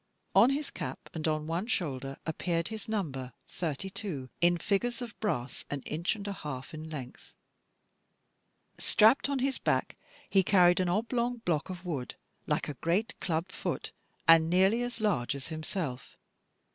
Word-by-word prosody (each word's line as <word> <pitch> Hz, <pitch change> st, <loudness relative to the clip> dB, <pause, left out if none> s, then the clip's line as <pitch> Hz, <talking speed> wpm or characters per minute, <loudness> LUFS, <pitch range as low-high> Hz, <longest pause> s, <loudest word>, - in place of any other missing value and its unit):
On 240 Hz, -, +7 dB
his 285 Hz, +2 st, -1 dB
cap, -, -, -6 dB
and 160 Hz, -1 st, -2 dB
on 155 Hz, -1 st, 0 dB
one 170 Hz, +6 st, -2 dB
shoulder, 135 Hz, -, -2 dB
appeared 165 Hz, +1 st, -1 dB
his 220 Hz, -1 st, -6 dB
number, 135 Hz, -, -2 dB
32, 175 Hz, -, -4 dB
in 175 Hz, 0 st, +5 dB
figures 230 Hz, +7 st, 0 dB
of 240 Hz, -2 st, -6 dB
brass, 125 Hz, -, -2 dB
an 145 Hz, -1 st, -3 dB
inch 165 Hz, +9 st, -1 dB
and 205 Hz, -1 st, -7 dB
a 200 Hz, -, -2 dB
half 145 Hz, -4 st, -6 dB
in 155 Hz, 0 st, -6 dB
length. 135 Hz, -5 st, -8 dB, 1.4 s
Strapped 225 Hz, +6 st, +5 dB
on 280 Hz, -, +1 dB
his 265 Hz, +1 st, 0 dB
back -, -, +1 dB, 0.3 s
he 195 Hz, -, +4 dB
carried 180 Hz, -2 st, +5 dB
an 185 Hz, -1 st, +2 dB
oblong 235 Hz, +4 st, 0 dB
block 160 Hz, 0 st, +1 dB
of 185 Hz, 0 st, -7 dB
wood, 145 Hz, -8 st, -3 dB, 0.3 s
like -, -, 0 dB
a 150 Hz, -, -3 dB
great 175 Hz, -, 0 dB
club 170 Hz, +1 st, -1 dB
foot, -, -, -3 dB, 0.4 s
and 165 Hz, -1 st, +7 dB
nearly 190 Hz, +6 st, +4 dB
as 245 Hz, -1 st, -3 dB
large 175 Hz, -, +1 dB
as 140 Hz, +2 st, -6 dB
himself. 155 Hz, -, -4 dB
175 Hz, 160 wpm, -31 LUFS, 155-210 Hz, 1.4 s, On